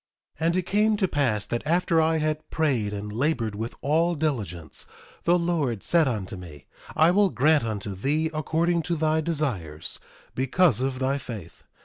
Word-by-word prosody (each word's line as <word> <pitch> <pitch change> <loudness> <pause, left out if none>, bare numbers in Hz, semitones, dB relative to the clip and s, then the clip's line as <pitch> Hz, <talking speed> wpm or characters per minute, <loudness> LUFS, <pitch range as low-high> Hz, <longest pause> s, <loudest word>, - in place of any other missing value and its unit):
1:12 160 - -1
And 170 - +2
it 185 - +2
came 210 +4 +2
to 195 -2 +2
pass 120 - 0
that 120 - -2
after 170 +1 +2
I 160 0 +2
had 155 0 -2
prayed 130 -10 0
and 105 0 -5
labored 120 -3 0
with 110 +3 -5
all 165 +4 +2
diligence, 105 - -3 0.4
the 175 +1 +5
Lord 160 - -1
said 165 -3 +3
unto 105 -6 -3
me: 85 -6 -11 0.3
I 160 +2 +5
will 200 +1 +4
grant 145 +4 +3
unto 105 -2 -4
thee 150 +11 0
according 165 +3 +1
to 170 - +2
thy 155 0 +1
desires, 120 - -3 0.3
because 135 +2 +2
of 130 0 -1
thy 135 +2 0
faith. 105 -10 -9
145 Hz, 170 wpm, -26 LUFS, 110-165 Hz, 0.4 s, the